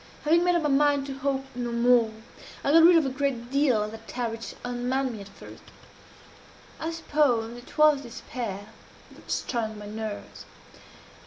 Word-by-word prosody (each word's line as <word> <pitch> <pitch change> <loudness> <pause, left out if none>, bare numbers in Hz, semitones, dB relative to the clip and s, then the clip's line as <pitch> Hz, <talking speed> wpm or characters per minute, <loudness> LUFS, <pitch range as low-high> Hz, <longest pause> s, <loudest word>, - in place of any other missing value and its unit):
Having 330 +3 +4
made 355 0 +3
up 340 - +1
my 300 - +1
mind 285 0 +3
to 270 -1 -7
hope 270 0 -1
no 240 -1 -3
more, 235 -1 +4 0.5
I 280 - +2
got 330 +2 +7
rid 340 +2 +8
of 320 - +3
a - - 0
great 260 -3 -2
deal 270 -6 +3
of 210 - -5
that 225 0 -11
terror 240 -2 -3
which 225 0 -7
unmanned 250 +2 -1
me 215 - -8
at 200 - -10
first. 200 - -13 1.2
I 320 - -3
suppose 285 -8 0
it 245 +5 -13
was 300 -2 +5
despair 230 -4 -6 0.5
that - - -17
strung 220 -3 -2
my 210 - -9
nerves. 215 0 -7
250 Hz, 175 wpm, -26 LUFS, 230-285 Hz, 1.2 s, rid